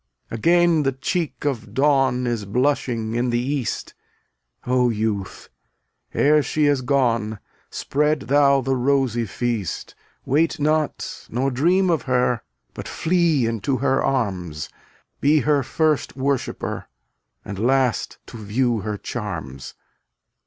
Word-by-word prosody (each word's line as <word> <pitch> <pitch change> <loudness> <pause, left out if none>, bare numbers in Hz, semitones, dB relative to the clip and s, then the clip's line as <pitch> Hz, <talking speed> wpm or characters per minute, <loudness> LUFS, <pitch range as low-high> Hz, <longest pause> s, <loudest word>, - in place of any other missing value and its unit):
251 115 - -5 0.4
Again - - +2
the 135 - +2
cheek 150 +4 -3
of 125 -6 -2
Dawn 135 -3 +3
Is 115 -4 -2
blushing 120 -1 0
in 120 +1 0
the 120 - +1
east. 130 -1 -2 0.7
O 125 0 +2
youth! 105 -3 -3 0.7
ere 150 +1 +4
she 150 +1 0
is 145 -2 +2
gone, 115 -5 +1 0.3
Spread 150 +1 0
thou 140 0 +4
the 135 +1 0
rosy 130 -3 +1
feast. 115 -3 -3 0.3
Wait 155 +4 +1
not, 155 +1 -1
nor 130 +4 0
dream 175 +8 +2
of 160 - +1
her, 125 -2 +1 0.3
But - - -7
flee 165 -6 +1
into 115 +3 -1
her 135 +1 +1
arms; 90 - -2 0.5
Be 150 +1 +4
her 145 -2 +2
first 155 +3 0
worshipper 135 -1 -2 0.6
And 100 -2 -6
last 125 -1 +1
to - - -10
view 120 +2 +1
her 105 +1 -4
charms. 80 - -6
130 Hz, 125 wpm, -22 LUFS, 115-145 Hz, 0.7 s, ere